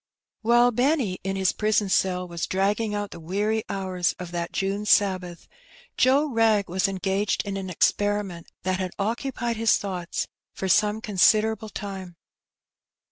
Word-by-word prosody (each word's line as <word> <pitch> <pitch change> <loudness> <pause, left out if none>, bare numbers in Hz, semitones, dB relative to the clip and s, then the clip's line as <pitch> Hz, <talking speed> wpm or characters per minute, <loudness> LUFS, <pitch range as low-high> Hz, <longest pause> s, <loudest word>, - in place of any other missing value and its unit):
While 240 +2 +4
Benny 245 - +1
in 195 +1 -2
his 190 -1 +2
prison 215 -1 +1
cell 180 -1 +1
was 170 -1 -4
dragging 205 +3 0
out 205 -1 -3
the 170 - -9
weary 205 +6 -1
hours 185 -2 -1
of 180 -1 -7
that 170 -1 -3
June 200 +2 -2
Sabbath, 185 -4 +1 0.5
Joe 270 +4 +4
Wrag 225 -6 +2
was 185 +2 +1
engaged 195 +2 -1
in 200 -1 -3
an 190 -1 -4
experiment 200 -1 0 0.2
that 185 +1 0
had 185 -2 -3
occupied 235 +2 -2
his 225 0 +3
thoughts 180 -4 -4 0.3
for 190 - -3
some 210 +3 +3
con 210 -4 -6
siderable 220 +2 +3
time. 190 -4 -7
200 Hz, 150 wpm, -25 LUFS, 185-220 Hz, 0.5 s, While